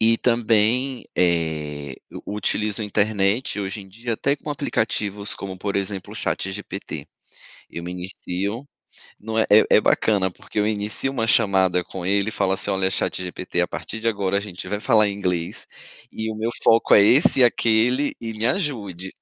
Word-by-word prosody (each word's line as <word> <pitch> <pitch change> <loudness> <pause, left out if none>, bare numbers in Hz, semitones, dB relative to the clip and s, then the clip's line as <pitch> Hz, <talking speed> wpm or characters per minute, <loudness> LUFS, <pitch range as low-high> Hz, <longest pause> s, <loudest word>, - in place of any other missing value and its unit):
E 115 +1 +4
também, 120 +2 +1
eh, 75 -5 0
eu - - -9
utilizo 105 0 -1
a - - -2
internet, 105 +2 +1
hoje 100 0 -3
em 95 - -13
dia 115 +4 -5
até 140 +6 0
com 150 - -7
aplicativos 105 -7 -1
como, 95 -1 -7
por 100 +1 -3
exemplo, 95 -1 -3
o - - -9
ChatGPT. 95 +1 -4 0.6
Eu 85 - -7
me 90 - -5
inicio 95 +5 -4 0.5
não 110 +1 -4
é 110 - +3
é 105 +1 +7
é 105 - +4
bacana 100 -4 +2
porque 105 - -6
eu 105 - +2
inicio 105 +5 -1
uma 120 -4 -1
chamada 95 -5 +3
com 90 0 -7
ele 100 +2 +1
e - - -8
falo 95 - +1
assim: 100 +1 -2
"Olha 95 -1 +1
ChatGPT, 90 -1 -2
a 90 - +1
partir 90 +8 -6
de 115 - -2
agora 100 -3 +1
a - - +2
gente 90 -3 -7
vai 105 +2 -2
falar 110 -3 +4
em - - -3
inglês, 90 -4 -3 0.4
e 110 0 -3
o - - -6
meu 110 +2 -1
foco 115 0 +5
é - - +8
esse 130 - +5
e - - +8
aquele, 120 +4 +2
e 115 -1 -4
me 110 +1 -3
ajude". 105 - -2
105 Hz, 185 wpm, -23 LUFS, 95-115 Hz, 0.6 s, é